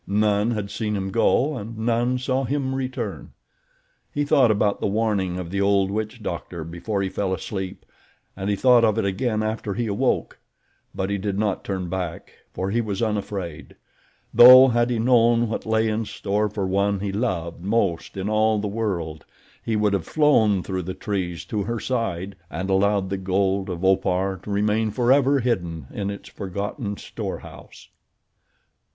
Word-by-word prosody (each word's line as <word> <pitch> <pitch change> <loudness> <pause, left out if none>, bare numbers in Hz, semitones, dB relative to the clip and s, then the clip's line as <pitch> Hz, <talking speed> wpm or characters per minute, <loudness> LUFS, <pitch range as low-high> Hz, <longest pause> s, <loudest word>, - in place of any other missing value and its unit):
None 105 +1 +2
had 105 -3 -3
seen 105 -2 -2
him 95 -1 -3
go 135 +6 +2
and 115 -1 -7
none 120 +2 +1
saw 130 +1 -1
him 135 +1 -1
return. 130 -1 -4 0.8
He 145 0 -1
thought 135 -4 +4
about 105 -1 +1
the - - 0
warning 100 -4 0
of 90 -2 -6
the 100 0 -1
old 100 -1 +2
witch 110 +2 -4
doctor 85 -1 -5
before 85 +5 -3
he 95 - -1
fell 95 -1 -1
asleep 95 -1 -6 0.5
and 95 +1 -3
he 100 - +2
thought 125 +2 +5
of 110 -1 +3
it 110 - +1
again 110 +3 0
after 110 -2 -3
he 120 - -1
awoke; 100 -2 -1 0.6
but 95 +1 -2
he 100 - -1
did 100 0 -2
not 105 -2 -1
turn 95 -2 -3
back 90 -2 -4 0.2
for 95 +1 -3
he 120 +3 +1
was 105 -2 -3
unafraid, 100 -6 -4 0.6
though 130 +2 +10
had 120 0 +2
he 120 - 0
known 120 0 +4
what 110 - -4
lay 110 0 +2
in 110 +1 0
store 105 +1 -1
for 100 -1 -3
one 100 +1 +1
he 100 0 -3
loved 90 -7 -2
most 100 -4 -1
in 95 +1 -2
all 110 0 +2
the 105 0 -2
world 90 -8 -3 0.4
he 115 - -1
would 105 -1 +2
have 95 -5 -1
flown 110 - +3
through 95 -1 -3
the 90 +1 -5
trees 90 -5 -3
to 105 - -2
her 115 +1 -2
side 100 -7 -2
and 95 +1 -3
allowed 95 0 +2
the 100 - -1
gold 95 +1 0
of 90 0 -3
Opar 95 0 +1
to - - -10
remain 105 +2 +1
forever 130 +5 +3
hidden 85 - -2
in 100 -1 -3
its 100 0 -7
forgotten 100 +2 -5
storehouse. - - -8
105 Hz, 175 wpm, -23 LUFS, 95-115 Hz, 0.8 s, though